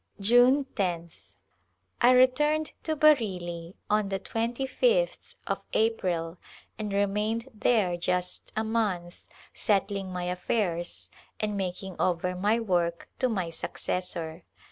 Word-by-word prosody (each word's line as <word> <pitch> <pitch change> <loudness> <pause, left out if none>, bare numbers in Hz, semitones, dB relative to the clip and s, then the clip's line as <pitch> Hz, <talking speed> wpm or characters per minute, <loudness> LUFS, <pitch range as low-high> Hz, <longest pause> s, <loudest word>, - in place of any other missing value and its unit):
'June 245 +7 +5
loth. 170 - -3 0.6
I 245 - +7
returned 295 +5 +4
to 315 - -1
Bareilly 185 - +2
on 210 -1 +1
the 195 -1 -1
25th 265 - 0
of - - -2
April 180 -7 0 0.4
and 210 -1 -3
re 200 +1 +3
mained 215 +4 -1
there 210 -4 +2
just 180 +1 0
a 220 - 0
month 205 -6 -2 0.3
settling 195 -2 0
my 180 -1 -3
affairs 180 -1 -2 0.3
and 210 -1 -1
mak 185 -1 -3
ing 190 -2 -7
over 180 0 0
my 205 +5 +2
work 175 -6 0
to 255 - +2
my 185 -7 -2
successor. 170 -1 -4
200 Hz, 120 wpm, -28 LUFS, 180-230 Hz, 0.6 s, I